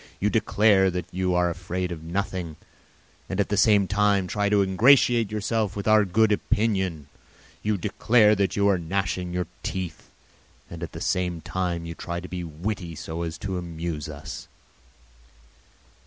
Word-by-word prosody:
You 105 +1 +1
declare 105 -3 +3
that 90 0 -3
you 90 0 0
are 90 0 +2
afraid 90 +1 -4
of 80 -2 -6
nothing 90 -1 -3 0.7
and 95 - -3
at 100 - +1
the 105 - +1
same 100 -1 +4
time 100 0 +2
try 100 +3 0
to 100 -1 +4
ingratiate 115 +2 +4
yourself 105 -1 -1
in 100 - -3
our 110 -1 +5
good 110 +4 +3
opinion. 95 -7 0 0.6
You 105 -1 0
declare 105 +3 +3
that 100 -2 0
you 100 0 +2
are 100 -3 +3
gnashing 90 +1 -2
your 90 0 -1 0.2
teeth 90 -4 -5 0.6
and 85 -1 -8
at 85 - -6
the - - -7
same 90 -2 -1
time 85 +1 -3
you 85 - -5
try 85 +1 -5
to 90 - -8
be 90 -1 -5
witty 85 +1 -5
so 80 +1 -5
as 80 -2 -4
to 95 0 -3
amuse 85 -3 -5
us. 70 -1 -8
95 Hz, 165 wpm, -25 LUFS, 85-105 Hz, 0.7 s, our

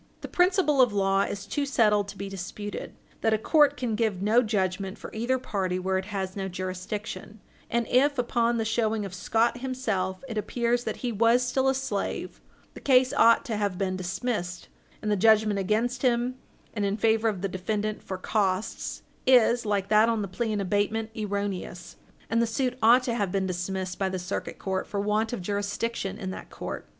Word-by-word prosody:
The - - -5
principle 355 -6 +3
of 245 -4 +4
law 195 -1 +2
is 200 0 -3
too 290 - -2
well 280 - -1
settled 210 -6 +3
to 200 - -9
be 200 - -5
disputed 195 +2 -6 0.3
that 220 -1 +3
a - - +1
court 290 +5 +4
can 245 -3 -2
give 215 -4 0
no 215 +5 +4
judgment 195 -3 -1
for - - -10
either 240 +4 0
party 190 -7 -2
where 190 +1 0
it 190 - -6
has 190 -2 -4
no 195 -1 -3
jurisdiction; 185 +4 -5 0.3
and 235 0 +1
if, 280 +3 +3
upon 235 -1 +1
the 225 - -1
showing 220 -1 0
of 190 - -7
Scott 225 +6 +1
himself, 220 -8 -2
it 225 -4 -2
appeared 235 +3 0
that - - -3
he 245 - 0
was 230 +3 +3
still 260 +2 +1
a 265 - +1
slave, 220 -7 -3 0.3
the - - -10
case 255 -2 +4
ought 230 0 +5
to 225 -5 -2
have 200 -3 -1
been 185 -1 -1
dismissed, 185 0 -3 0.3
and 210 - 0
the - - +3
judgment 215 0 +4
against 230 +6 0
him 245 -1 +2 0.4
and 210 - -2
in 200 +1 0
favor 225 0 +3
of 195 -3 -4
the - - +2
defendant 210 +3 -2
for 190 - -5
costs 195 0 -1 0.2
is, 240 -2 +5
like 200 -1 0
that 215 +2 +5
on 225 -2 0
the - - -3
plea 220 +5 -2
in 210 - -1
abatement, 205 +3 0
erroneous, 200 -4 -4 0.3
and 230 +1 +1
the 235 - +2
suit 250 +2 -1
ought 240 +3 +6
to 245 - -1
have 200 -5 -1
been 195 0 0
dismissed 185 0 -3
by 195 -1 +1
the 185 - -3
Circuit 180 0 -4
Court 190 -1 -2
for 200 - -3
want 210 +2 0
of 240 -7 -4
jurisdiction 205 +1 -2
in 190 -4 -4
that - - -8
court. - - -6
210 Hz, 200 wpm, -27 LUFS, 195-235 Hz, 0.4 s, ought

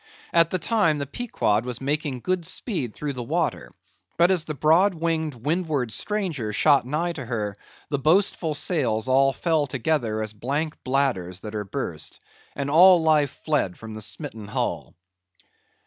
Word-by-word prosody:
At 165 -1 +5
the 185 - 0
time 185 -4 +2
the 140 - -3
Pequod 135 - -1
was 125 -1 -4
making 140 -2 -2
good 185 +3 -1
speed 160 - -2
through 145 -1 -3
the 125 - -5
water; 115 - -2 0.5
but 175 +2 +5
as 175 -4 +1
the 155 - -4
broad 170 +7 +4
winged 160 -3 -1
windward 145 -1 -1
stranger 165 - -2
shot 135 +4 +3
nigh 165 +5 -1
to 150 -5 -6
her, 110 -4 -3 0.3
the 140 - -1
boastful 160 0 +2
sails 125 - 0
all 135 +1 +4
fell 150 +4 0
together 125 -4 -1
as 110 -1 -5
blank 145 +8 -3
bladders 125 -10 0
that 105 - -7
are 105 -1 -3
burst, 95 - -5 0.4
and 140 0 -3
all 180 +3 +8
life 155 -3 +2
fled 145 - 0
from 110 -1 -9
the 110 - -6
smitten 110 -1 -5
hull. 105 - -3
145 Hz, 165 wpm, -24 LUFS, 120-165 Hz, 0.5 s, all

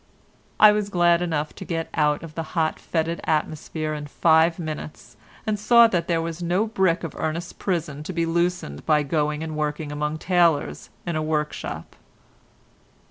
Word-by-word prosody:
I 215 - +9
was 210 -1 -1
glad 175 -2 +3
enough 155 -3 -2
to - - -9
get 165 -1 -3
out 150 -1 +1
of 165 -2 -9
the 165 - -3 0.2
hot, 160 -1 +1
fetid 165 0 -2
atmosphere 155 0 -2
in 150 -1 -5
five 160 +2 +3
minutes, 155 -3 -7 0.3
and 215 -2 -1
saw 235 +3 +7
that 175 -7 0
there 165 -2 +1
was 165 +1 -5
no 180 +5 +1
brick 190 -6 +1
of 165 - -5
Ernest's 165 +2 -3
prison 165 -6 -3
to - - -4
be 170 -2 0
loosened 170 - -1
by 150 -1 +4
going 150 +1 -1
and 160 -1 -5
working 150 0 -2
among 150 +1 -2
tailors 170 -3 +1 0.2
in 170 -2 -2
a 155 - 0
workshop. 155 -1 -3
165 Hz, 170 wpm, -24 LUFS, 155-175 Hz, 0.3 s, I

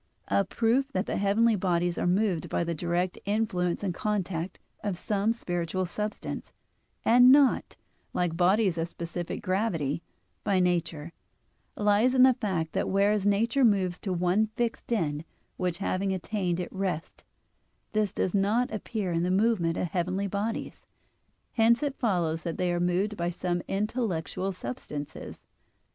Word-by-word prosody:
A 200 - +3
proof 235 +7 +1
that 185 +2 0
the - - -2
heavenly 215 +3 +3
bodies 175 -2 0
are - - 0
moved 185 -2 +1
by - - 0
the 170 0 -2
direct 175 +2 -1
influence 200 -4 0
and 190 -3 -1
contact 190 -3 -2 0.3
of 200 -4 -2
some 205 +3 0
spiritual 175 -4 -2
substance, 210 +4 -5 0.5
and 245 +2 +7
not, 280 -1 +4 0.3
like 175 -2 -1
bodies 185 0 +3
of 165 - 0
specific 170 0 -5
gravity, 185 -7 0 0.4
by 195 -2 +2
nature, 170 -3 0 0.6
lies 210 +5 +3
in 255 - +7
the 260 0 +7
fact 190 -10 -2
that - - 0
whereas 200 +1 +2
nature 230 +6 +2
moves 190 -6 +3
to 195 - -4
one 180 +4 +2
fixed 240 -1 -2
end 155 -9 0 0.3
which 180 -2 -1
having 195 0 -1
attained, 185 -1 -1
it 180 - -5
rests; 185 -4 -3 0.7
this 215 -3 +1
does 185 - -1
not 215 +5 +2
appear 210 -3 -3
in 165 0 +1
the 180 - 0
movement 185 -4 +2
of 175 - -1
heavenly 185 +4 -1
bodies. 205 +3 -4 0.7
Hence 235 +4 +4
it 285 -2 -2
follows 175 - 0
that 170 -2 -4
they 180 -1 +1
are 175 - 0
moved 180 +4 +1
by 170 0 0
some 175 0 -2
intellectual 195 -3 -1
substances. 145 -2 -7
190 Hz, 150 wpm, -28 LUFS, 175-215 Hz, 0.7 s, and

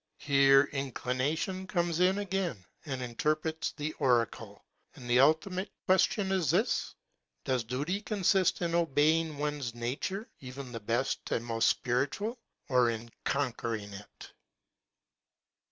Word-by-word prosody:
Here 135 -1 +5
inclination 140 +7 -2
comes 175 -4 0
in 185 +2 +4
again 190 - -2 0.2
and 130 -2 -3
interprets 155 +6 -1
the 155 0 -4
oracle. 120 -3 0 0.3
And 125 - -10
the 120 +1 +4
ultimate 180 +7 +2 0.2
question 190 +1 +2
is 185 -7 +1
this: 195 - +1 0.5
Does 130 -3 0
duty 145 - -2
con 210 -2 -4
sist 185 -1 +3
in 170 -1 -1
obeying 160 -1 +2
one's 145 -5 -3
nature, 140 - -3
even 130 0 -8
the 115 - -5
best 115 +5 -1
and 115 - -1
most 115 -1 +2
spiritual? 145 - -1 0.3
or 125 -3 +4
in 115 0 -5
conquering 115 -6 -2
it 100 +1 -12
145 Hz, 125 wpm, -30 LUFS, 125-180 Hz, 0.5 s, Here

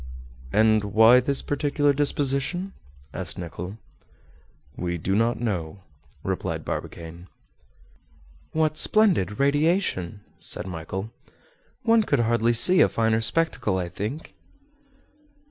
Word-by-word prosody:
"And 110 +2 +3
why 110 +4 +5
this 135 +2 -1
peculiar 145 0 0
disposition?" 145 +6 0 0.4
asked 85 -5 -5
Nicholl. 90 +3 -7 1.0
"We 85 -1 -3
do 90 +4 -2
not 115 +3 +1
know," 95 -5 -4 0.4
replied - - -3
Barbicane. 85 +1 -7 1.2
"What 155 -1 0
splendid 180 - +2
radiation!" 140 - 0 0.2
said - - -2
Michel. 95 +4 -6 0.7
"One 230 0 +4
could 140 - +1
hardly 115 0 +1
see 180 +11 +6
a - - +5
finer 110 0 +1
spectacle, 115 - 0
I 90 -2 -3
think." 105 - -6
115 Hz, 105 wpm, -24 LUFS, 95-145 Hz, 1.2 s, see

